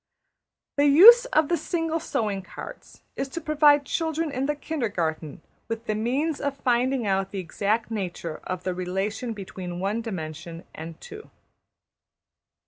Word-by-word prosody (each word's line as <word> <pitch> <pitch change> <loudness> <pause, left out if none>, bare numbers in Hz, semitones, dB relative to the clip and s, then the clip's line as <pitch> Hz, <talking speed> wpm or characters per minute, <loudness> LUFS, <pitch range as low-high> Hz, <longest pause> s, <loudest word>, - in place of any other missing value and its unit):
The 285 +1 +4
use 450 - +9
of 315 -11 +2
the 345 - +1
single 330 -2 -2
sewing 210 -10 -2
cards - - -11
is 270 - -2
to 335 - -5
provide 295 -2 +4
children 320 0 -1
in 270 0 -2
the 295 - 0
kindergarten 175 - -3 0.2
with 230 0 -4
the 215 - -1
means 265 +8 -1
of 280 -1 -2
finding 250 -1 +1
out 195 -1 0
the 200 - -7
exact 205 +5 -1
nature 175 -6 -4
of 185 -1 -4
the 185 - -1
relation 195 +6 -3
between 185 -4 -7
one 200 +5 -1
dimension 170 -5 -6
and 160 +1 -8
two. 425 +1 -11
230 Hz, 145 wpm, -25 LUFS, 185-295 Hz, 0.2 s, use